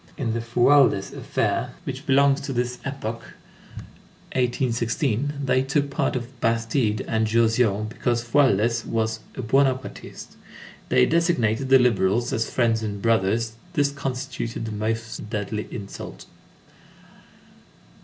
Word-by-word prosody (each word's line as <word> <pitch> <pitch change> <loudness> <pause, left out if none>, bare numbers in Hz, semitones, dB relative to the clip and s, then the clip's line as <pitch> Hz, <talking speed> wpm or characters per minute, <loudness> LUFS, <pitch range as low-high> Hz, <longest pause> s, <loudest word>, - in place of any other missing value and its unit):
In 120 -5 -1
the 115 - -1
Fualdès 120 -2 +3
affair, - - -1
which 135 +3 -6
belongs 140 0 +4
to 135 - -4
this 125 0 -2
epoch, 115 -4 -4 1.1
1816, 125 +1 0
they 130 0 +3
took 140 +1 0
part - - 0
for 125 - -1 0.2
Bastide 115 -1 +1
and 110 0 0
Jausion, 115 -2 +2
because 120 +1 -1
Fualdès 120 -3 +2
was 110 0 -1 0.2
"a 130 - -5
Buonapartist." 130 +2 -1 0.5
They 65 - +5
designated 135 -8 +1
the 135 - +8
liberals 120 -2 +2
as 115 - -1
f_riends 115 -3 +1
and 105 -2 -4
brothers_; 115 +1 +1 0.2
this 145 -3 +2
constituted 130 -4 -4
the 110 - -4
most 110 0 -3
deadly 105 0 -3
insult. 100 -4 -8
115 Hz, 120 wpm, -24 LUFS, 110-135 Hz, 1.1 s, the